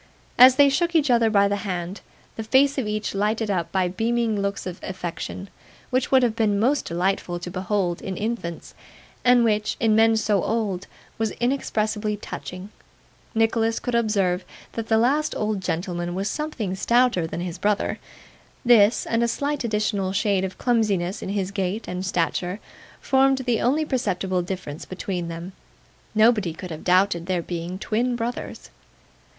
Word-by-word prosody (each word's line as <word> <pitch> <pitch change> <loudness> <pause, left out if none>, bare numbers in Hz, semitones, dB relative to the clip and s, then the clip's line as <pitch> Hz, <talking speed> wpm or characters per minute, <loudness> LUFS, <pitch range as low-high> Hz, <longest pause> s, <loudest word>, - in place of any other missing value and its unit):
As 255 +1 +9
they 285 +1 +6
shook 340 +5 +1
each 300 -5 +3
other 235 -2 +4
by 200 -2 +4
the 200 0 0
hand: 185 -1 -4 0.3
the - - -4
face 270 +5 +3
of 240 - -2
each 210 0 -2
lighted 210 +2 0
up 175 -4 -1
by 190 -2 +1
beaming 225 +2 0
looks 200 0 -2
of 180 -1 -6
affection, 185 +1 -5 0.4
which 255 0 +1
would 260 -1 +5
have 230 -3 +1
been 210 -3 +1
most 270 +6 +2
delightful 175 0 -1
to 175 +1 -7
behold 185 -1 -1
in 190 -1 -5
infants, 210 -7 -4 0.5
and 245 -1 +5
which, 215 -2 +1
in 220 -2 +3
men 225 0 +5
so 210 -3 +1
old, 205 -4 -2 0.3
was 225 -1 +1
inexpressibly 215 -4 -1
touching: 185 -1 -7 0.7
Nicholas 225 0 +2
could 245 - -4
observe 200 -6 +1 0.3
that 225 -1 -5
the 220 - +3
last 285 +7 +2
old 215 -2 -1
gentleman 175 0 -3
was 195 +2 -2
something 250 -8 -3
stouter 235 -3 +2
than 165 - -5
his 175 -1 -5
brother; 205 +1 0 0.7
this, 230 -2 +5
and 230 0 0
a 235 - +3
slight 285 +4 -2
additional 210 -4 0
shade 200 -1 +1
of 190 -1 -4
clumsiness 205 -7 0
in - - -5
his 195 -1 -2
gait 200 +2 -2
and 180 +1 -4
stature, 180 +1 -1 0.4
formed 270 0 +3
the 240 -3 +1
only 295 +6 +2
perceptible 190 -9 -1
difference 175 -4 -6
between 185 -2 -4
them. 170 +2 -6 0.6
Nobody 215 -6 +4
could 180 +1 -8
have 155 - -7
doubted 180 -1 +2
their 180 -2 0
being 175 +1 -5
twin 235 +5 -1
brothers. 240 +1 -5
210 Hz, 165 wpm, -24 LUFS, 185-235 Hz, 0.7 s, As